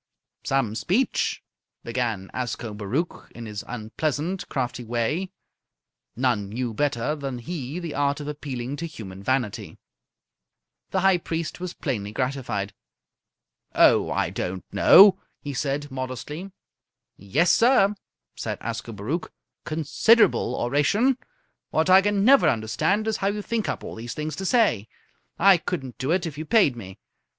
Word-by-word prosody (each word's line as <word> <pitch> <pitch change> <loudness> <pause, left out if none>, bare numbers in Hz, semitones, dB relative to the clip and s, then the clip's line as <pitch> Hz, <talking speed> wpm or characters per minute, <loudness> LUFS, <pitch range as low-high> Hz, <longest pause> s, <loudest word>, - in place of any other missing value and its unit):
"Some 135 -6 0
speech!" 205 - 0 0.4
began 115 -5 -2
Ascobaruch 115 - -3
in 115 - -7
his 105 -2 -6
unpleasant, 150 - -3
crafty 125 -2 -3
way. 120 +11 -1 0.9
None 120 -5 0
knew 120 +2 -3
better 145 +2 0
than 135 -4 -5
he 145 +2 -5
the 170 -4 -5
art 145 0 0
of 145 - -6
appealing 140 -3 -5
to 170 - -4
human 100 - -9
vanity. 125 -1 -2 1.1
The 190 - 0
High 190 -1 +4
Priest 165 0 -4
was 180 -1 -5
plainly 105 -9 -3
gratified. 125 -5 -2 1.0
"Oh, - - +5
I - - 0
don't 95 +1 -4
know," 195 0 +8 0.2
he 145 - -6
said, 145 +1 -2
modestly. 130 +7 -5 0.7
"Yessir!" 180 - +3 0.4
said - - -4
Ascobaruch. 115 - -4 0.4
"Considerable 165 +9 +3
oration! 150 - +2 0.5
What 160 +3 +1
I 190 +1 +8
can 205 0 +1
never 275 +2 +6
understand 115 - 0
is 220 - 0
how 195 - -1
you 205 +1 -2
think 230 -1 -2
up - - -3
all - - -7
these 115 +1 -7
things 155 +1 -4
to 190 - -3
say. 200 - +2 0.5
I 195 -2 +6
couldn't 135 -8 -5
do 130 +2 -2
it 175 +1 +1
if 150 -3 -6
you 155 - -4
paid 195 - +4
me. 95 -5 -9
140 Hz, 135 wpm, -25 LUFS, 120-180 Hz, 1.1 s, know